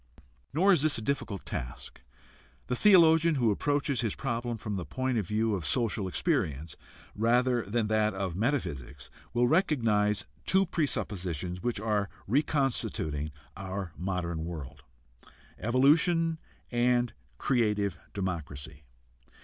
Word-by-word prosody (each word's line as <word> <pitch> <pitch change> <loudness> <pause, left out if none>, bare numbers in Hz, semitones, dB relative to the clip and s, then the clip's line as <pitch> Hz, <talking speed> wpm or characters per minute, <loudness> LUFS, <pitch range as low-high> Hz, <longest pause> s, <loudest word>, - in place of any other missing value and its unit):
Nor 190 +7 +4
is 165 - +3
this 155 -1 +4
a - - -3
difficult 115 -7 -3
task. 60 +1 -6 0.6
The 125 - -1
theologian 165 - +6
who 120 -5 +2
approaches 140 +2 0
his 115 -4 -1
problem 120 -2 -3
from 105 -1 -4
the 95 - -3
point 130 - -1
of 100 - -3
view 110 +2 +1
of 95 -5 -2
social 105 - 0
experience 85 - -1 0.4
rather 120 +3 +2
than 110 +3 0
that 110 -1 +1
of 95 -3 -3
metaphysics 80 - -2 0.2
will 120 +1 +2
recognize 115 - +2 0.2
two 190 +1 +4
presuppositions 90 - -2
which 120 -1 -1
are 105 -2 0 0.2
reconstituting 115 - 0 0.2
our 95 -2 -5
modern 85 -3 -3
world: 80 -5 -7 0.8
evolution 155 - +3 0.3
and 120 0 +2 0.2
creative 105 - +1 0.2
democracy. 75 -7 -4
110 Hz, 120 wpm, -29 LUFS, 95-135 Hz, 0.8 s, theologian